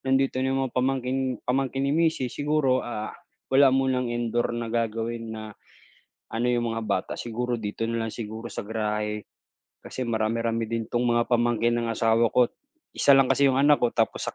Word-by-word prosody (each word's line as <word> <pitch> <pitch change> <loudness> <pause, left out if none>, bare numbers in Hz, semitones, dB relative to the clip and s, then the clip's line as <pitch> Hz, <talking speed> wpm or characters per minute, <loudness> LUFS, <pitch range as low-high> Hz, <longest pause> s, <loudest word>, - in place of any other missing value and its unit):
nandito 135 0 +1
na 130 - +1
yung 135 - 0
mga 130 - -5
pamangkin 130 0 0 0.3
pamangkin 135 +1 0
ni 140 - +1
misis 160 -6 +1
siguro, 145 -3 +1
ah, 110 -3 -5 0.4
wala 135 +1 +7
munang 130 -1 +1
indoor 120 0 -1
na 115 -1 -4
gagawin 115 0 -2
na 110 -1 -6 0.9
ano 115 +2 -1
yung 120 -1 +1
mga 115 0 -3
bata, 100 -2 -1
siguro 120 +1 -2
dito 105 +1 -4
na 115 0 -1
lang - - -5
siguro 110 0 -6
sa - - -6
garahe. 105 0 -3 0.5
Kasi 130 - -6
marami-rami 115 0 -1
din 115 0 -3
'tong 120 +1 0
mga 120 0 +3
pamangkin 120 -1 +2
ng 115 - -1
asawa 115 +1 +3
ko't 125 -1 +4 0.4
isa 140 - +4
lang 135 -1 +4
kasi 140 - +4
yung 135 - +3
anak 145 +1 +5
ko 120 - 0
tapos 115 -1 +1
sa - - -4
120 Hz, 185 wpm, -26 LUFS, 115-130 Hz, 0.9 s, wala